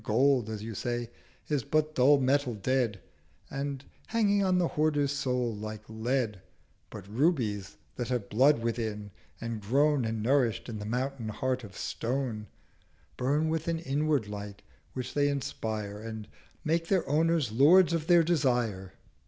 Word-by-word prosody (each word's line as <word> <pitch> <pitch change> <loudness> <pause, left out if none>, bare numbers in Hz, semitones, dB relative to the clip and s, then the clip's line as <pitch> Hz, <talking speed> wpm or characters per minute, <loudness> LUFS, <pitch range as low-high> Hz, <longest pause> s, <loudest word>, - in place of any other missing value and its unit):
Gold, 125 +1 +2
as 110 -1 -5
you 115 0 -5
say, 120 +2 -3 0.4
is 145 -5 0
but 155 +4 0
dull 140 +1 +5
Metal 130 -2 +1
dead, 115 -1 0 0.5
And 140 0 -4 0.2
hanging 205 -3 +2
on 185 -1 +2
the 175 -2 +2
Hoarder's 150 -2 +1
Soul 125 -4 -1
like 110 0 -6
Lead: 110 -2 -1 0.5
But 100 -3 -9
Rubies 110 - 0 0.2
that 120 - -2
have 125 -5 -2
Blood 130 +2 +4
within, 110 -3 -3 0.3
and 115 -2 -4
grown 140 +6 +2
And 110 -1 -2
nourisht 125 -2 +2
in 110 -3 -5
the 105 - -6
Mountain 125 0 -2
Heart 130 +3 -2
of 100 -2 -10
Stone, 120 -3 -3 0.7
Burn 145 +5 +1
with 160 0 -2
an 165 -1 0
inward 150 -5 0
Light, 100 -1 -7 0.3
which 130 -1 -5
they 145 0 +2
inspire, 110 -7 -3
370 110 0 -6
And 105 -1 -9 0.4
make 165 +1 0
their 190 -2 +1
Owners 155 -3 +2
Lords 170 +9 +6
of 160 -1 -1
their 175 -1 +6
Desire.' 120 - 0
125 Hz, 155 wpm, -29 LUFS, 110-145 Hz, 0.7 s, Lords